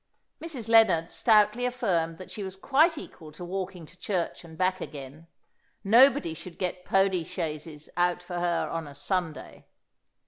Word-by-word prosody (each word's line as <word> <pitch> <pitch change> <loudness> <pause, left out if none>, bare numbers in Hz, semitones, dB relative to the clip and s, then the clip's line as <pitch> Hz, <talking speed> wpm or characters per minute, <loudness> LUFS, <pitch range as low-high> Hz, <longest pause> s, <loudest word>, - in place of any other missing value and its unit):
Mrs. 275 -9 -5
Lennard 200 -8 +5
stoutly 215 +1 +3
affirmed 180 -10 0
that 185 - -10
she 215 - -6
was 190 -1 -5
quite 300 - +3
equal 160 - -10
to 175 +4 -8
walking 185 -1 -5
to 170 - -17
church 180 -4 -2
and 160 -1 -13
back 185 0 +1
again. 145 +2 -9 0.6
Nobody 240 - +5
should 170 +2 -10
get 180 -1 -3
pony 195 -2 +2
chaises 155 -1 -5
out 175 0 +1
for 175 -1 -5
her 175 -1 0
on 165 -2 -4
a 140 - -11
Sunday. 165 +2 -4
180 Hz, 160 wpm, -27 LUFS, 165-210 Hz, 0.6 s, Lennard